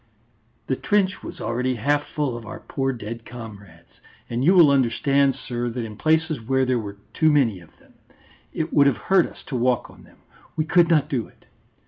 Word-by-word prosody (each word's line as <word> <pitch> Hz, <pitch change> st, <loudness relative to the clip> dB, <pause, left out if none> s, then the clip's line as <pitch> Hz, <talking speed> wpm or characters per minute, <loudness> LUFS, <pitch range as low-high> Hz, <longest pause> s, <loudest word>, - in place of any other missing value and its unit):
"The -, -, -1 dB
trench 200 Hz, -3 st, 0 dB
was -, -, -9 dB
already 125 Hz, +3 st, -1 dB
half 145 Hz, +6 st, 0 dB
full 145 Hz, -6 st, -2 dB
of 120 Hz, -, -7 dB
our 110 Hz, -, -8 dB
poor 135 Hz, 0 st, -2 dB
dead 115 Hz, -1 st, -7 dB
comrades. 110 Hz, -5 st, -12 dB, 0.3 s
And 120 Hz, +2 st, -1 dB
you 180 Hz, +6 st, +5 dB
will 165 Hz, -6 st, +7 dB
understand, 135 Hz, +1 st, +2 dB
sir, 120 Hz, -2 st, -4 dB
that 120 Hz, 0 st, -4 dB
in 110 Hz, -1 st, -8 dB
places 160 Hz, +1 st, +1 dB
where 130 Hz, +3 st, +1 dB
there 125 Hz, -1 st, +1 dB
were 100 Hz, -2 st, -7 dB, 0.2 s
too 155 Hz, -1 st, +3 dB
many 120 Hz, -10 st, +2 dB
of 85 Hz, -, -19 dB
them, -, -, -24 dB, 0.6 s
it 160 Hz, 0 st, -3 dB
would 140 Hz, -1 st, +5 dB
have 135 Hz, -, +2 dB
hurt 190 Hz, -3 st, +2 dB
us -, -, -15 dB
to 135 Hz, -, -6 dB
walk 125 Hz, 0 st, 0 dB
on -, -, -17 dB
them; -, -, -20 dB, 0.4 s
we 155 Hz, -, 0 dB
could 170 Hz, +1 st, +4 dB
not 155 Hz, -4 st, +3 dB
do 125 Hz, -5 st, -2 dB
it. -, -, -25 dB
130 Hz, 200 wpm, -23 LUFS, 115-150 Hz, 0.6 s, will